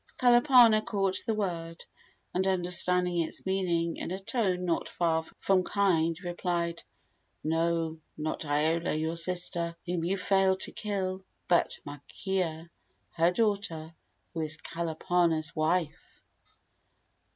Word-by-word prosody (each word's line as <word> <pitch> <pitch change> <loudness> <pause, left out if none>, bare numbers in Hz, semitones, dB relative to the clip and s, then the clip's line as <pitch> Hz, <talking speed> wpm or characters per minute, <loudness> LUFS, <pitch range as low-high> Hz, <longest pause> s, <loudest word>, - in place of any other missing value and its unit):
Kalapana 240 -3 +6
caught 195 -2 +1
the 225 - +1
word, 165 -5 -4 0.5
and, 190 +1 +1
understanding 180 -1 +2
its 160 - -4
meaning, 175 -3 0
in - - -5
a 185 - -3
tone 195 -3 -1
not 170 -2 -1
far 165 -2 +1 0.2
from 190 -2 +2
kind 170 -5 +1
replied: 175 -1 -2 0.6
"No, 165 0 0 0.2
not 155 +1 -3
Iola, 155 +3 0
your 160 +2 -1
sister, 170 0 0
whom 175 -2 -2
you 185 +4 0
failed 190 0 +2
to - - -1
kill, 190 -3 -3 0.2
but 175 -2 +2
Makea, 165 +3 -4 0.4
her 170 +1 +2
daughter, 180 -6 -1 0.4
who 165 - -3
is 155 -1 -1
Kalapana's 165 0 -1
wife." 160 0 -2
175 Hz, 120 wpm, -29 LUFS, 165-190 Hz, 0.6 s, Kalapana